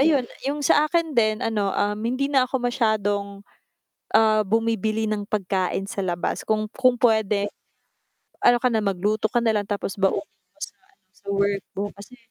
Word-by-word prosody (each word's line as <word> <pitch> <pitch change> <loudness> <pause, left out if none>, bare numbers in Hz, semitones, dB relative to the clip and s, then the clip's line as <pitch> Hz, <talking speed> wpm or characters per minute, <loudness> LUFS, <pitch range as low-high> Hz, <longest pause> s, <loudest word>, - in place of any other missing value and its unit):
ayun, 280 -3 +4 0.2
'yung 295 +1 -2
sa 295 - +5
akin 335 -2 0
din 215 -2 +3
ano, 210 -3 0
um, 205 +1 0
hindi 255 +4 0
na 265 -3 +3
ako 265 - -1
masyadong, 205 -5 0 0.7
ah, 215 -1 +5
bumibili 220 0 0
ng 210 -1 -2
pagkain 195 -1 -1
sa 200 - -3
labas. 175 -1 -2
Kung 215 0 +1
kung 255 -2 +3
puwede, 215 -3 +3 1.0
ano 245 - +7
ka 250 - +3
na, 220 - +2
magluto 205 +3 0
ka 240 - +3
na 225 - +3
lang, 205 -1 0
tapos 200 -1 -3
baunin 195 +9 +2
mo - - -45
sa - - -12 0.2
ano 390 - -34
sa 200 - -28
work 200 0 0
mo 200 - -1
kasi 200 +5 -13
215 Hz, 175 wpm, -24 LUFS, 200-245 Hz, 1.0 s, ano